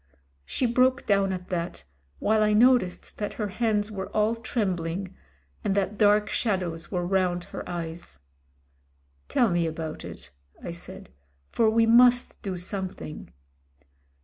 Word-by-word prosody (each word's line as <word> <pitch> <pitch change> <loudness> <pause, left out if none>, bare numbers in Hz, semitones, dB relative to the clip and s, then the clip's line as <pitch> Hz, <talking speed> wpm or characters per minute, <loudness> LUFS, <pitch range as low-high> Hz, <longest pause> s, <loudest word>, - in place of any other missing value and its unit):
She 260 - 0
broke 255 +3 +2
down 195 -1 +2
at 180 -1 -5
that, 175 - -3 0.3
while 215 0 +2
I 210 0 +3
noticed 235 -4 +3
that 205 - -3
her 210 -2 -3
hands 215 0 0
were 190 -2 -5
all 215 +1 +3
trembling, 190 -5 -2 0.5
and 195 - 0
that 200 +1 0
dark 210 0 +4
shadows 180 -8 -2
were 180 -2 -1
round 180 -1 +1
her - - -7
eyes. 165 - -6 1.1
"Tell 235 -5 +3
me 170 -1 +1
about 160 -1 -5
it," - - -10 0.3
I - - -4
said, - - -9 0.4
"for 225 - +3
we 225 +1 +4
must 245 +2 +5
do 190 -2 -4
some 190 +2 -3
thing." 150 - -9
200 Hz, 145 wpm, -26 LUFS, 175-220 Hz, 1.1 s, must